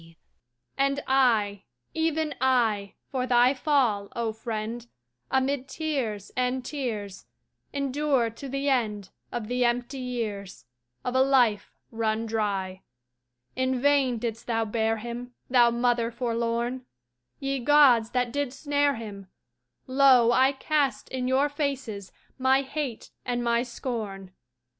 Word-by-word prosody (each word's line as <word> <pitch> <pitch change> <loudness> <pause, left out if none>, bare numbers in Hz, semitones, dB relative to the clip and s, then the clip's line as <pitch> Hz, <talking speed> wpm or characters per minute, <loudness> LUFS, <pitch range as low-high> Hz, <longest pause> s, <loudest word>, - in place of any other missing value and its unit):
A - - -17
Maiden 165 0 -19 0.6
And 275 +1 +2
I, 225 -7 +2 0.3
even 320 -1 0
I, 225 -6 +2 0.2
For 255 -1 -1
thy 245 +1 +5
fall, 255 -8 +1
O 230 -2 -1
Friend, 225 +1 -5 0.4
Amid 265 0 0
tears 265 -11 -3
and 255 0 -1
tears, 220 -9 -5 0.4
Endure 280 -3 0
to 265 +5 -9
the 275 +2 -2
end 215 -7 0 0.2
Of 235 -3 -4
the 250 +1 0
empty 245 +3 0
years, 220 -6 -5 0.4
Of 250 - -1
a 260 - +4
life 250 -6 +3 0.2
run 225 0 -1
dry. 200 -4 -2 0.7
In 260 0 0
vain 275 -2 +3
didst 230 0 -4
thou 225 -1 0
bear 225 +1 0
him, 240 +2 -7 0.2
Thou 240 -2 +6
Mother 235 0 +1
forlorn! 235 +1 -2 0.6
Ye 275 0 -2
Gods 255 -4 +5
that 250 -1 0
did 285 -3 -1
snare 285 0 +1
him, 205 -4 -8 0.6
Lo, 255 -3 +5
I 260 +3 +4
cast 285 0 0
in 255 -1 -2
your 265 +3 +3
faces 275 -9 -3 0.3
My 265 +1 +3
hate 275 -4 -5
and 245 -1 -2
my 235 0 +2
scorn! 220 -6 -5
245 Hz, 130 wpm, -27 LUFS, 225-270 Hz, 0.7 s, Thou